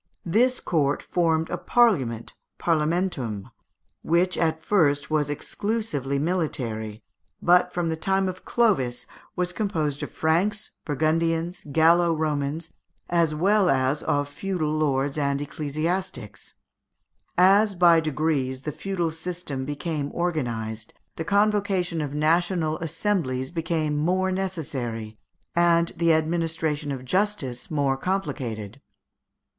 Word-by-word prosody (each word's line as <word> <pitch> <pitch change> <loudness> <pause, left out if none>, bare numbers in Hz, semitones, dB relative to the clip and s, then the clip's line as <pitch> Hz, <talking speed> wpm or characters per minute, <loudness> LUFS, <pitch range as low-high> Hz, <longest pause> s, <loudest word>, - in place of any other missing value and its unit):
This 245 +9 +2
court 145 -4 0
formed 165 -2 +1
a - - -2
parliament 140 - +2 0.2
(parlamentum), 155 - -1 0.5
which 175 +3 +2
at 160 -1 0
first 145 -8 +2
was 150 -2 +1
exclusively 150 - -2
military, 125 - -2 0.4
but 180 +1 +4
from 175 -2 -1
the 160 - 0
time 190 +3 +1
of 185 0 -5
Clovis 155 - +1 0.3
was 180 -1 -1
composed 160 -10 -1
of - - -4
Franks, 185 +7 0
Burgundians, 165 +3 0
Gallo 165 +2 +4
Romans, 155 +1 -2 0.4
as 165 -3 +2
well 195 +3 +3
as 135 +1 +2
of 145 0 0
feudal 155 +1 -2
lords 145 -2 0
and 140 -1 0
ecclesiastics. 150 - -3 0.8
As, 195 +3 +5
by 175 -2 +6
degrees, 145 -4 -1
the 150 - -3
feudal 175 0 -2
System 160 -5 -4
became 145 0 -3
organized, 115 -10 -2 0.2
the 160 - -3
convocation 200 -3 +1
of 145 -1 -4
national 160 +1 +1
assemblies 160 -6 -1
became 160 -3 -1
more 185 +5 +1
necessary, 130 - -4 0.4
and 170 -1 +4
the 170 0 +3
administration 160 -2 0
of 130 -2 -5
justice 165 - -1
more 140 -3 +1
complicated. 135 - -3
160 Hz, 115 wpm, -25 LUFS, 140-180 Hz, 0.8 s, by